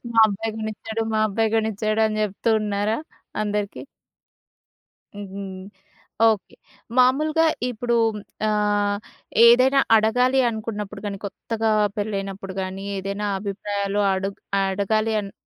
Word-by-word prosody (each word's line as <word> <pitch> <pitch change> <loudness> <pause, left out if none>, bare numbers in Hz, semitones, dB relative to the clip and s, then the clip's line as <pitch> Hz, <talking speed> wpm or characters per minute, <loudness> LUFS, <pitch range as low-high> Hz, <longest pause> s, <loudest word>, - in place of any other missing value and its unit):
"మా 225 - 0
అబ్బాయి 215 +2 -3
కొనిచ్చాడు. 220 +1 -4
మా 215 - +2
అబ్బాయి 220 +2 0
కొనిచ్చాడు" 215 0 0
అని 215 0 -2
చెప్తూ 210 +2 -1
ఉన్నారా 210 +1 0 0.4
అందరికి? 205 -1 -2 1.3
హ్మ్, 195 -1 -7 0.7
ఓకే. 210 -4 -2 0.4
మామూలుగా 305 +6 +4 0.2
ఇప్పుడు 240 0 -1 0.5
ఆహ్, 205 -1 +1 0.5
ఏదైనా 255 +3 +6 0.2
అడగాలి 250 +5 +3
అనుకున్నప్పుడు 210 -2 -5
కాని 200 -1 -3
కొత్తగా 220 +3 -2 0.3
పెళ్ళైనప్పుడు 195 -2 -4
గాని, 190 +1 -5
ఏదైనా 200 +2 -3
అభిప్రాయాలు 200 0 -2
అడుగ్ 195 +1 -3 0.2
అడగాలని 205 +1 0
210 Hz, 100 wpm, -23 LUFS, 200-220 Hz, 1.3 s, ఏదైనా